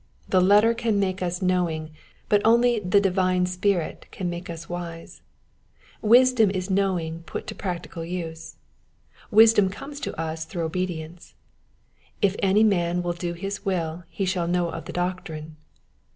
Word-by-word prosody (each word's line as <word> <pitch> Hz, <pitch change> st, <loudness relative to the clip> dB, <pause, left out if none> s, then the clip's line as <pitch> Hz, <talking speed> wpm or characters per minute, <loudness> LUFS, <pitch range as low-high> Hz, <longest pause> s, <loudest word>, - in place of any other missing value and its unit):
The 185 Hz, -, +4 dB
letter 205 Hz, +5 st, +5 dB
can 230 Hz, -3 st, 0 dB
make 190 Hz, -1 st, -1 dB
us 180 Hz, +1 st, -2 dB
knowing, 170 Hz, -4 st, 0 dB, 0.4 s
but 205 Hz, -1 st, +3 dB
only 235 Hz, +1 st, +4 dB
the 200 Hz, 0 st, +3 dB
divine 185 Hz, -2 st, +2 dB
Spirit 180 Hz, -1 st, -1 dB
can 180 Hz, -3 st, -4 dB
make 175 Hz, +1 st, -7 dB
us 165 Hz, 0 st, -7 dB
wise. 170 Hz, -1 st, -7 dB, 0.8 s
Wisdom 240 Hz, -1 st, +5 dB
is 190 Hz, 0 st, -3 dB
knowledge 180 Hz, -4 st, 0 dB
put -, -, -5 dB
to -, -, -6 dB
practical 175 Hz, -2 st, -5 dB
use. 165 Hz, -2 st, -6 dB, 0.7 s
Wisdom 220 Hz, -3 st, +6 dB
comes 280 Hz, +9 st, -8 dB
to -, -, -5 dB
us 160 Hz, 0 st, -3 dB
through 170 Hz, 0 st, -4 dB
obedience: 170 Hz, -1 st, -4 dB, 0.8 s
*'If 200 Hz, -2 st, +2 dB
any 195 Hz, +3 st, +4 dB
man 175 Hz, -4 st, +2 dB
will 175 Hz, 0 st, -1 dB
do 170 Hz, 0 st, -4 dB
his 195 Hz, +4 st, -5 dB
will 175 Hz, -4 st, -2 dB
he 195 Hz, -, -3 dB
shall 180 Hz, -2 st, -1 dB
know 175 Hz, 0 st, +1 dB
of 165 Hz, -, -7 dB
the -, -, -6 dB
doctrine." 160 Hz, -4 st, -4 dB
180 Hz, 150 wpm, -25 LUFS, 170-200 Hz, 0.8 s, Wisdom